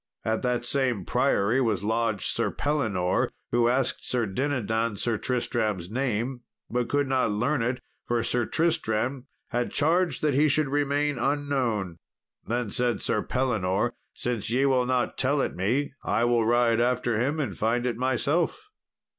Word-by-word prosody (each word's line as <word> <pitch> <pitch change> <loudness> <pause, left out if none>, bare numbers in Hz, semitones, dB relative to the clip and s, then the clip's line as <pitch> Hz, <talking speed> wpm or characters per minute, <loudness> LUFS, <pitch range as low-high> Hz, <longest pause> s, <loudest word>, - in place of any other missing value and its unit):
At 110 0 0
that 125 -1 -1
same 125 -8 0
priory 110 +7 +2
was 110 -5 0
lodged 110 -1 0
Sir - - 0
Pellinore, 110 -12 0 0.2
who 120 0 +3
asked 130 +1 0
Sir 120 -2 0
Dinadan 115 -1 -1
Sir 115 +3 +1
Tristram's 110 -7 -1
name, 125 0 -1 0.3
but 120 0 -1
could 145 -1 +1
not 130 -3 +1
learn 125 +7 0
it, 125 +2 -1 0.3
for 120 -1 +1
Sir 120 0 0
Tristram 130 -5 0 0.2
had 120 0 -1
charged 165 0 +1
that 150 -2 +2
he 145 +4 +4
should 150 -1 +2
remain 145 -1 0
unknown. 130 - -1 0.5
Then 115 -1 -1
said 120 -1 0
Sir - - 0
Pellinore, 115 -3 0 0.2
"Since 120 -4 -2
ye 130 +4 +2
will 130 -2 +2
not 125 -1 0
tell 140 +3 +2
it - - 0
me, 120 +11 0
I 115 - +1
will 120 -2 +2
ride 120 -1 +3
after 120 -2 +1
him 145 +6 0
and 145 - -2
find 120 +3 0
it 120 -2 0
myself." 150 - 0
120 Hz, 155 wpm, -26 LUFS, 115-135 Hz, 0.5 s, he